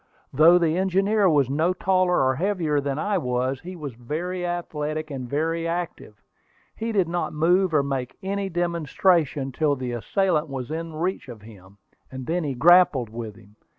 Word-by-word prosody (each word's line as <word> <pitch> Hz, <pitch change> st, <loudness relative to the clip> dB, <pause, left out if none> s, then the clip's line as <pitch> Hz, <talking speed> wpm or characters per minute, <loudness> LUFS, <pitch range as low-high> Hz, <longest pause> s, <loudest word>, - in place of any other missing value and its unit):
Though 160 Hz, +6 st, +7 dB
the 170 Hz, -1 st, +1 dB
engineer 195 Hz, +2 st, +2 dB
was 145 Hz, -5 st, +3 dB
no 155 Hz, +7 st, +1 dB
taller 185 Hz, -3 st, +2 dB
or 130 Hz, 0 st, +2 dB
heavier 165 Hz, -4 st, 0 dB
than 140 Hz, 0 st, -3 dB
I 200 Hz, +4 st, 0 dB
was, 125 Hz, -1 st, -1 dB
he 185 Hz, +4 st, -9 dB
was 150 Hz, -6 st, -7 dB
very 160 Hz, +10 st, -4 dB
athletic 155 Hz, -3 st, -3 dB
and 130 Hz, -3 st, -6 dB
very 165 Hz, +4 st, -1 dB
active. 165 Hz, -, -5 dB, 0.5 s
He 225 Hz, +1 st, -3 dB
did 195 Hz, -5 st, +1 dB
not 175 Hz, +1 st, -2 dB
move 175 Hz, +4 st, +3 dB
or 150 Hz, -3 st, +3 dB
make 135 Hz, -2 st, -4 dB
any 195 Hz, 0 st, -2 dB
demonstration 170 Hz, -4 st, 0 dB
till 145 Hz, +2 st, +1 dB
the 130 Hz, -2 st, -4 dB
assailant 155 Hz, -, 0 dB
was 130 Hz, -1 st, -5 dB
within 165 Hz, 0 st, -4 dB
reach 170 Hz, -6 st, -2 dB
of 110 Hz, -4 st, -10 dB
him, 100 Hz, -3 st, -15 dB, 0.3 s
and 130 Hz, -1 st, -7 dB
then 170 Hz, +4 st, -1 dB
he 140 Hz, -3 st, -3 dB
grappled 160 Hz, -4 st, +5 dB
with 115 Hz, -2 st, -7 dB
him. 105 Hz, -1 st, -19 dB
155 Hz, 175 wpm, -24 LUFS, 130-180 Hz, 0.5 s, Though